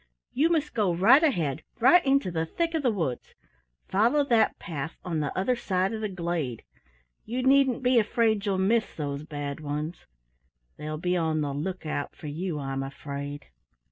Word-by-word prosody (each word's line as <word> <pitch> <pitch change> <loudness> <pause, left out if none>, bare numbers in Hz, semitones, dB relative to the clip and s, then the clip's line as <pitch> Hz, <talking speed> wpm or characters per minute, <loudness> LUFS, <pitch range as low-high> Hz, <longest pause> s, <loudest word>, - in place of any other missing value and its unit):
You 305 +5 +3
must 315 -3 0
go 210 -5 +2
right 230 - +6
ahead, 165 - +1 0.2
right 265 +10 +6
into 270 -9 +2
the 165 -1 -1
thick 335 - -1
of 320 - 0
the 260 - +2
woods. 165 - -3 0.5
Follow 235 +9 +3
that 235 -5 +2
path 155 -2 -6
on 170 -3 -1
the 145 -2 -1
other 220 +7 +1
side 190 -3 -1
of 220 - -4
the 215 - -2
glade. 170 - -3 0.6
You 250 +3 -3
needn't 265 -1 +4
be 250 -1 +5
afraid 220 -1 +1
you'll 200 -2 0
miss 215 +4 +1
those 145 -2 -3
Bad 145 -2 -5
Ones 150 +3 -5 0.7
they'll 155 0 -5
be 180 +3 0
on 160 -3 0
the 145 -2 -2
lookout 155 -1 -4
for - - -12
you, 160 +3 -3
I'm 135 -1 -3
afraid." 140 +1 -6
180 Hz, 170 wpm, -27 LUFS, 150-235 Hz, 0.7 s, right